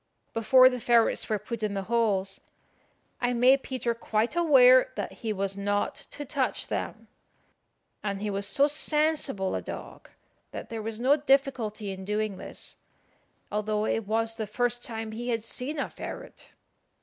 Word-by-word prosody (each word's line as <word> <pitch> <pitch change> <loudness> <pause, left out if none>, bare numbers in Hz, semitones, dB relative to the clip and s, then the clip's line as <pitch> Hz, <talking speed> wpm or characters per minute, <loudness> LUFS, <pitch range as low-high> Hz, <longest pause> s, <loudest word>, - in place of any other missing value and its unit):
Before 255 +3 +6
the 250 -1 0
ferrets 235 -1 +3
were 215 - +1
put 230 +2 -6
in 210 -2 -1
the 195 - -2
holes, 205 -3 0 0.8
I 245 0 +1
made 255 +3 +5
Peter 255 -3 -2
quite 225 +3 -1
aware 255 -7 +6
that - - -4
he 225 - -4
was 195 -1 -2
not 205 +1 -1
to 290 - -8
touch 275 -2 -1
them; - - -4 1.0
and 200 -2 -2
he 210 0 -2
was 200 0 -1
so 275 +7 +4
sensible 300 -8 0
a - - -2
dog - - -9 0.4
that - - -8
there 225 -1 -4
was 220 0 -4
no 270 +4 +4
difficulty 270 -8 +1
in 190 0 -7
doing 210 0 -2
this, - - -8 0.7
although 210 0 -1
it 225 -2 -1
was 225 +1 0
the 220 - -3
first 245 +3 -1
time 225 -2 -5
he 240 +3 -5
had 230 -2 -1
seen 255 +6 -3
a 275 - -1
ferret. - - -9
225 Hz, 160 wpm, -28 LUFS, 210-255 Hz, 1.0 s, Before